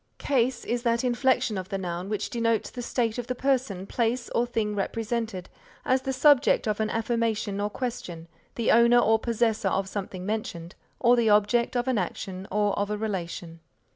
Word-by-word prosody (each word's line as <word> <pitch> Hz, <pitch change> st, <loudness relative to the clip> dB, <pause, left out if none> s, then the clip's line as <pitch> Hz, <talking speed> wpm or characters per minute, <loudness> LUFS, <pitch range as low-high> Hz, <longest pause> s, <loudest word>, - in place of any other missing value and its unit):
Case 255 Hz, -2 st, 0 dB
is 240 Hz, 0 st, -1 dB
that 235 Hz, 0 st, +1 dB
inflection 250 Hz, -3 st, +1 dB
of 185 Hz, -, -7 dB
the 195 Hz, -, -2 dB
noun 180 Hz, 0 st, -4 dB
which 210 Hz, -1 st, -3 dB
denotes 230 Hz, -2 st, 0 dB
the 245 Hz, -, -6 dB
state 235 Hz, -1 st, -1 dB
of 240 Hz, -, -5 dB
the 255 Hz, -, -2 dB
person, 250 Hz, -8 st, 0 dB
place 235 Hz, +3 st, -1 dB
or 240 Hz, +1 st, +1 dB
thing 220 Hz, -3 st, -1 dB
represented, 220 Hz, -2 st, -3 dB, 0.4 s
as 260 Hz, 0 st, +2 dB
the 265 Hz, -, -2 dB
subject 275 Hz, -2 st, +4 dB
of 210 Hz, 0 st, -1 dB
an 215 Hz, 0 st, 0 dB
affirmation 225 Hz, -3 st, -1 dB
or 205 Hz, -, 0 dB
question, 195 Hz, -9 st, -5 dB, 0.3 s
the 230 Hz, -, +1 dB
owner 235 Hz, +1 st, +6 dB
or 225 Hz, -2 st, +4 dB
possessor 225 Hz, -3 st, 0 dB
of 195 Hz, +1 st, -1 dB
something 190 Hz, -2 st, -5 dB
mentioned, 190 Hz, -5 st, -4 dB, 0.3 s
or 245 Hz, 0 st, +5 dB
the 235 Hz, -2 st, +2 dB
object 210 Hz, +4 st, +3 dB
of 245 Hz, +1 st, -1 dB
an 255 Hz, -5 st, +2 dB
action 185 Hz, +1 st, -5 dB
or 205 Hz, 0 st, +1 dB
of 205 Hz, 0 st, -1 dB
a 210 Hz, -, -2 dB
relation. 175 Hz, -5 st, -4 dB
225 Hz, 185 wpm, -26 LUFS, 200-240 Hz, 0.4 s, owner